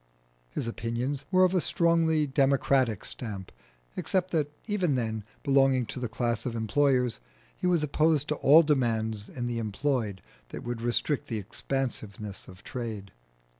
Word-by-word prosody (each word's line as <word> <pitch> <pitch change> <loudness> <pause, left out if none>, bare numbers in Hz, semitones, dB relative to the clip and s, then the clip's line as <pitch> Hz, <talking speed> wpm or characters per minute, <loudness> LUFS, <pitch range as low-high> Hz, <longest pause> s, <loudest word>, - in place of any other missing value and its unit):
His - - -3
opinions 115 +4 -3
were 185 -1 +5
of 185 0 +4
a 185 - +3
strongly 165 -3 +2
democratic 135 - +2
stamp, 100 -6 -5 0.4
except 185 -1 0
that 150 -3 0
even 190 -9 +1
then, 110 -3 -2 0.2
belonging 135 -3 +4
to 125 - -6
the 125 -2 -3
class 120 +1 -1
of 120 -2 -3
employers, 125 - +2 0.4
he 180 - -2
was 175 -4 +3
opposed 150 0 +2
to 150 - +1
all 155 +4 +7
demands 110 -7 0
in 120 -2 -4
the 120 -1 -2
employed 110 -3 -1 0.3
that - - -7
would 120 -1 -4
restrict 120 +4 0
the 115 - -2
expansiveness 105 -2 -4
of 90 +1 -13
trade. 110 -6 -5
125 Hz, 150 wpm, -28 LUFS, 115-150 Hz, 0.4 s, all